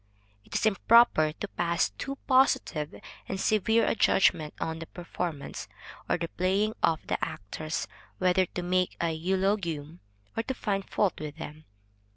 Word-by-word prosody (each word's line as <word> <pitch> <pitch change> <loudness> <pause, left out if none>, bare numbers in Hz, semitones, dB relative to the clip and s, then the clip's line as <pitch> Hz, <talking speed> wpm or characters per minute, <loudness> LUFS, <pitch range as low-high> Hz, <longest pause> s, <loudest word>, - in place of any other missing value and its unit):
It - - -10
is - - +1
improper 215 -6 +5
to 205 - -5
pass 170 -3 0
too 275 - -5
positive 255 - +2 0.3
and 190 - -2
severe 220 +2 +3
a - - +2
judgment 170 -7 +3
on 160 0 -3
the 165 - -7
performance, 175 -4 -5 0.4
or - - +3
the 170 -1 -3
playing 195 +5 0
of 165 -1 +2
the - - -2
actors, 155 +11 -4 0.3
whether 185 0 +3
to 180 - -5
make 180 0 0
a 170 -1 +1
eulogium, 170 -2 -1 0.4
or 225 - +1
to 265 +3 -4
find 195 -4 -2
fault 200 -3 +1
with 150 -1 -6
them. 155 +1 -8
180 Hz, 155 wpm, -28 LUFS, 160-205 Hz, 0.4 s, improper